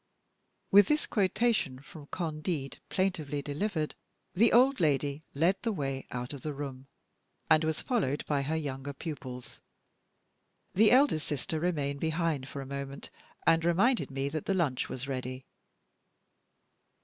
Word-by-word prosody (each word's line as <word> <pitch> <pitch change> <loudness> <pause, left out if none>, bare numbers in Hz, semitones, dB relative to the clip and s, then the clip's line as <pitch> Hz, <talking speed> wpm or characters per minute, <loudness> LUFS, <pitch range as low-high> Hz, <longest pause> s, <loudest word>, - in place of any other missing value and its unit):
_ - - -48 0.7
With 200 0 +8
this 300 0 +2
quotation 210 - +1
from 145 +2 -12
"Candide," 155 -4 -3
plaintively 155 -7 -1
delivered, 155 +2 -2 0.4
the 220 +5 +4
old 260 +3 +5
lady 145 -2 +1
led 170 +7 +3
the 230 - 0
way 135 -7 -3
out 125 +2 -4
of 140 - -7
the 150 +1 -4
room, 135 -2 -6 0.6
and 155 0 +6
was 160 0 -1
followed 185 - 0
by 145 -2 +1
her 150 +4 -1
younger 140 -2 -4
pupils. 130 -5 -7 1.1
The 215 +3 +6
eldest 255 - +4
sister 150 +2 -2
remained 145 -5 -1
behind 160 -4 0
for 140 - -6
a - - -10
moment, 140 0 -6 0.3
and 165 0 +4
reminded 195 +9 +3
me 135 0 -2
that 155 0 -4
the 195 - +2
lunch 150 -8 0
was 130 +1 -5
ready. 130 -1 -4
150 Hz, 145 wpm, -30 LUFS, 140-180 Hz, 1.1 s, With